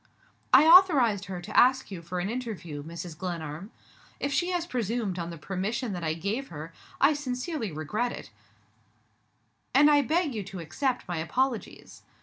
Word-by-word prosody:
"I 265 +4 +8
authorized 290 - +6
her 180 -2 -6
to 210 +3 -8
ask 260 -2 +4
you 180 -3 -6
for 180 +2 -5
an 175 - -2
interview, 205 -11 -5
Mrs. 165 +2 -7
Glenarm. 170 0 -5 0.5
If 280 0 -2
she 350 +4 +1
has 350 -2 -1
presumed 230 - -2
on 170 0 -4
the 170 - -7
permission 200 - -3
that 175 -2 -5
I 160 -1 0
gave 210 +11 -3
her, 155 +1 -8 0.3
I 280 +3 +5
sincerely 260 - -3
regret 210 +11 -2
it, - - -9 1.4
and 295 +2 +7
I 290 -1 +5
beg 310 +1 0
you 215 - -3
to 190 - -8
accept 250 - -2
my 175 -1 -3
apologies. 245 +9 -2
215 Hz, 165 wpm, -28 LUFS, 175-265 Hz, 1.4 s, I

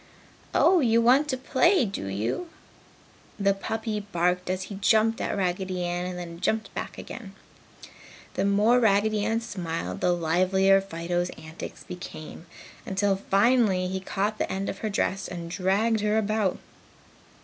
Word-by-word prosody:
"Oh, 370 - +5
you 230 -5 +3
want 255 +6 +4
to 260 -3 -1
play, 270 +5 +3
do 195 - -5
you?" 110 - -2 0.9
the 200 0 +3
puppy 220 +2 -3
dog 205 0 -13
barked, 180 +1 0
as 185 0 -1
he 200 - -8
jumped 220 +2 +3
at - - -2
Raggedy 185 -1 -1
Ann 175 +1 -2
and 180 -1 -5
then 170 -1 -7
jumped 220 +4 -1
back - - -5
again. 200 -6 -9 1.0
The - - -1
more 210 +5 +4
Raggedy 215 -1 +2
Ann 225 +2 0
smiled, 165 - -4
the 180 - +3
livelier 185 +3 +3
Fido's 175 -1 -2
antics 155 +1 -9
became, 175 -1 -9 0.4
until 195 +1 +1
finally 200 -1 +2
he 190 0 -2
caught 205 +3 -2
the - - -1
end 195 +1 -2
of 195 - -5
her 220 - -2
dress 195 -1 -1
and 170 -1 -6
dragged 205 +5 +1
her 210 +1 +1
about. 215 -3 +1
195 Hz, 155 wpm, -26 LUFS, 180-220 Hz, 1.0 s, Oh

